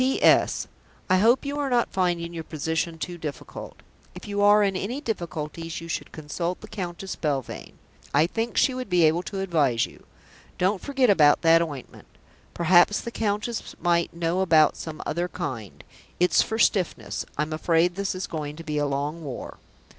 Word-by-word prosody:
"P.S. 260 +1 +3 0.5
I 185 - +6
hope 235 +8 +4
you 285 +1 -3
are 285 -2 -1
not 240 -2 +1
finding 175 -2 0
your 165 -1 -5
position 160 +2 -2
too 175 +2 -5
difficult. 150 -4 -7 0.3
If - - -9
you 205 0 -1
are 205 +1 +6
in 195 -1 +1
any 220 +9 -3
difficulties 165 - -4
you 165 - -9
should 165 - -4
consult 170 +4 -4
the - - -11
Countess 190 -2 -5
Belvane. 140 -5 -4 0.3
I 150 +3 +4
think 225 +6 -3
she 265 - +4
would 255 -3 -5
be 180 -2 +4
able 160 +2 +4
to 195 +1 -5
advise 145 -11 +2
you. - - -16 0.5
Don't 190 +2 +1
forget 270 -5 +2
about 150 -5 +5
that 165 0 +6
ointment. 145 -6 -6 0.5
Perhaps 175 +4 +4
the 235 - -6
Countess 215 +1 -2
might 170 -1 +1
know 170 +1 -1
about 160 -4 +5
some 160 -1 -7
other 175 +4 -1
kind. 130 - -6 0.4
It's 180 +1 +4
for 220 - -2
stiffness. 195 -5 +1
I 150 - +2
am 155 +1 -5
afraid 165 +2 +2
this 195 +1 -2
is 185 - -3
going 150 -3 -5
to 165 - -9
be 150 -2 -2
a 145 - +1
long 145 +4 -3
war." 135 -4 -7
175 Hz, 180 wpm, -25 LUFS, 155-200 Hz, 0.5 s, I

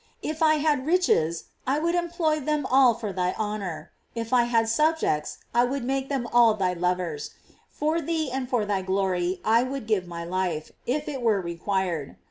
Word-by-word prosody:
If 310 +1 -4
I 310 -1 +5
had 295 -3 +1
riches, 240 - +2 0.2
I 270 +2 +2
would 335 +3 0
employ 340 -3 0
them 300 0 -1
all 260 -3 +5
for 215 -4 -5
thy 180 0 0
honor; 195 -7 -4 0.2
if 230 +1 -4
I 245 -1 +5
had 230 -2 +2
subjects, 300 - +1 0.2
I 240 +1 +4
would 260 +1 -1
make 270 +1 -1
them 265 -4 -1
ail 235 -2 +6
thy 185 -3 0
lovers; 180 -4 -2 0.3
for 310 +3 -1
thee 315 -3 -1
and 255 -1 -3
for 240 -5 +1
thy 200 -2 0
glory 185 -1 0
I 225 +2 +5
would 260 -1 -4
give 210 -5 0
my 170 -1 -6
life, 175 -3 -2 0.2
if 295 +5 -1
it 275 -4 -4
were 220 -4 +2
required. 170 -3 -2
230 Hz, 185 wpm, -26 LUFS, 185-285 Hz, 0.3 s, ail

